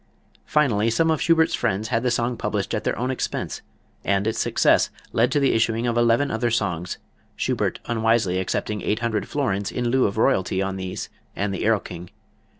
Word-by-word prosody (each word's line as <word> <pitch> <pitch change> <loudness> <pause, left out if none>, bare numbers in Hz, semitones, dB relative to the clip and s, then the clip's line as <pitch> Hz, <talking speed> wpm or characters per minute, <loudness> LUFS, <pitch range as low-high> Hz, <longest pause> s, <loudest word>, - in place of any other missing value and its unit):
Finally, 115 -8 +2
some 160 +8 +2
of 160 - 0
Schubert's 165 -1 +3
friends 105 +4 -1
had 115 - +1
the 125 - +1
song 120 +1 0
published 105 -3 -2
at 105 - -1
their - - -1
own 125 +3 -1
expense, 130 - -3 0.4
and 100 0 +1
its 110 - -1
success - - +3 0.2
led 120 +2 +3
to 145 - +2
the 140 -1 +3
issuing 115 +1 +1
of 120 -1 0
eleven 120 +4 +3
other 120 +2 0
songs, 90 -6 -1 0.4
Schubert - - -1
unwisely 115 -5 +1
accepting 105 +2 -2
eight 105 - 0
hundred 115 -3 -1
florins 100 -9 -1
in 120 -1 -1
lieu 130 +1 +3
of 100 - -2
royalty 95 -3 +2
on 95 0 -1
these 95 -1 -5 0.3
and 100 0 -1
the 95 - -1
"Erlking." 90 -5 -1
115 Hz, 185 wpm, -23 LUFS, 100-120 Hz, 0.4 s, Schubert's